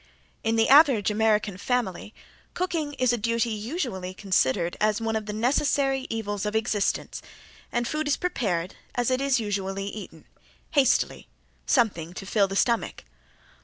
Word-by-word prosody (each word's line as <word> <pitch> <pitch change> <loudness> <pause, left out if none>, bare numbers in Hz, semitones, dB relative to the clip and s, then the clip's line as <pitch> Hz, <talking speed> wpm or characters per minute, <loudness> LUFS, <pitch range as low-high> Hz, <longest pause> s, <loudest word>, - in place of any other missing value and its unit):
In 225 0 +1
the 225 0 +3
average 270 -8 +6
American 210 -2 +1
family 210 -4 -2 0.4
cooking 330 -5 -2
is 255 -3 +1
a 240 - -1
duty 230 +1 0
usually 215 - -4
considered 175 -4 +1
as 215 0 +2
one 225 -1 -2
of 215 -1 -3
the - - -2
necessary 270 +3 +1
evils 205 -3 -3
of 210 0 -2
existence, 215 -2 -1 0.5
and 240 0 -1
food 305 0 -2
is 290 - +2
prepared 190 - -2 0.2
as 245 +1 +1
it 255 +1 +1
is 275 -2 +2
usually 195 -2 -3
eaten 190 -6 -9 0.5
hastily 280 -4 +2 0.4
something 180 - +1
to 195 - -7
fill 200 0 +2
the 195 - -5
stomach. 235 +2 0
220 Hz, 150 wpm, -26 LUFS, 200-255 Hz, 0.5 s, average